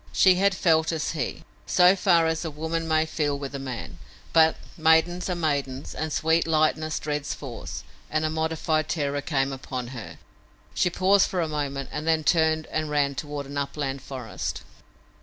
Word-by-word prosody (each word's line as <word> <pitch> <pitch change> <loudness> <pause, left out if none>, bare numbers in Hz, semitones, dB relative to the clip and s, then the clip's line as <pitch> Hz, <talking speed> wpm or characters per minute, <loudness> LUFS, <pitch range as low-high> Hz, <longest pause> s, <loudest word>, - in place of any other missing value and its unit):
She 190 - +6
had 195 +1 +2
felt 160 -2 +3
as 160 -2 -2
he; 150 -6 -4 0.2
so 180 +1 +6
far 175 -4 +4
as 160 0 0
a 165 - -3
woman 160 +2 -3
may 160 0 +2
feel 150 -3 -1
with 140 -1 -6
a 140 - -4
man; 130 -3 -6 0.3
but 160 -1 +6 0.2
maidens 160 +3 +3
are 180 - 0
maidens, 140 -5 -2
and 155 0 -3
sweet 160 +2 +2
lightness 155 0 +1
dreads 150 -1 -3
force, 125 -5 -7 0.3
and 155 0 0
a - - +1
modified 160 -1 0
terror 145 -3 -1
came 135 -3 0
upon 130 -2 -5
her. 105 -11 -8 0.6
She 180 - +2
paused 190 +3 +3
for 185 - -2
a 165 - +1
moment, 140 -3 -3
then 160 0 +1
turned 160 -1 +2
and 155 -1 -1
ran 145 -1 +1
toward 145 +1 -5
the 140 0 -2
upland 140 -1 -3
forest. 130 -4 -5
155 Hz, 175 wpm, -26 LUFS, 140-160 Hz, 0.6 s, She